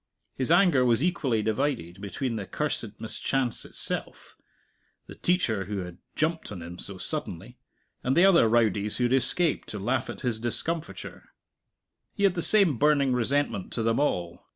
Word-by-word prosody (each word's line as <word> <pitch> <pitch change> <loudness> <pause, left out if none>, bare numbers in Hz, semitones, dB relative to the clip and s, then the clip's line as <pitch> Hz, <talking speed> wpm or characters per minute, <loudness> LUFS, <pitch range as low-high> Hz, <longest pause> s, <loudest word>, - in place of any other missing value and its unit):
His 130 - -2
anger 170 -6 +5
was 120 +2 +2
equally 135 -11 0
divided 110 - -2
between 115 +5 -3
the 100 -4 -5
cursed - - -3
mischance 130 -4 -2
itself, - - -2 0.7
the - - -11
teacher 120 - 0
who 100 -1 -3
had 90 0 -10 0.2
"jumped" 160 -2 -1
on 90 -5 -7
him 85 +1 -9
so 100 -1 -5
suddenly, - - -6 0.4
and 130 +5 +1
the 175 - +7
other 170 -12 +5
rowdies 105 -3 +2
who 125 - 0
had 120 +1 +2
escaped 140 +5 +1
to 105 - -5
laugh 120 +6 -1
at - - -7
his 120 -4 -1
discomfiture; 160 +8 -4 0.9
he 205 - -2
had 195 -2 +5
the 175 - -2
same 190 - +4
burning 145 -3 +3
resentment 125 -4 0
to 115 - 0
them 115 +2 +1
all. 85 -12 -2
125 Hz, 165 wpm, -27 LUFS, 105-150 Hz, 0.9 s, the